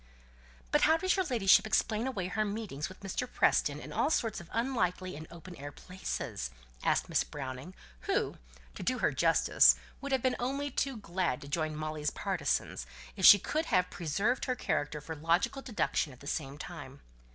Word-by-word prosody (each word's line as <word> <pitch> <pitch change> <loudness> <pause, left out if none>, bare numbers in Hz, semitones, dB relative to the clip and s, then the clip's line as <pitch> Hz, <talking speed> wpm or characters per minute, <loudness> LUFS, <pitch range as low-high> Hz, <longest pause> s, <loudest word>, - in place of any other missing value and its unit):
"But - - +4
how 320 +1 +5
does 370 +2 +1
your 380 -1 +1
ladyship 220 - +4
explain 220 +2 +1
away 200 -9 -2
her 215 +4 0
meetings 200 -8 -4
with 185 - -13
Mr. 220 +6 -3
Preston - - +2
in - - -9
all - - +2
sorts 225 - 0
of 170 - -14
unlikely 185 - -1
and 155 +2 -8
open 170 +1 -11
air 145 +1 -7
places?" 180 - -5 0.3
asked - - +2
Miss - - +2
Browning, 135 +5 -7 0.3
who, - - 0 0.4
to - - -8
do - - 0
her - - +2
justice, - - +5 0.3
would 280 - -5
have 265 -3 +1
been 255 -1 +1
only 275 +3 -2
too 270 -3 -1
glad 180 -9 -1
to 140 - -9
join 155 +1 -1
Molly's 155 -1 -2
partisans, - - -2 0.3
if 190 -3 +6
she 205 - +12
could 310 - -2
have 180 -4 +2
preserved 200 - 0
her 255 - 0
character 150 -9 -2
for 160 +2 -6
logical 170 - +1
deduction 215 - -1
at 130 - -15
the - - -13
same 140 -1 -3
time. 145 -4 -9
185 Hz, 185 wpm, -31 LUFS, 155-240 Hz, 0.4 s, she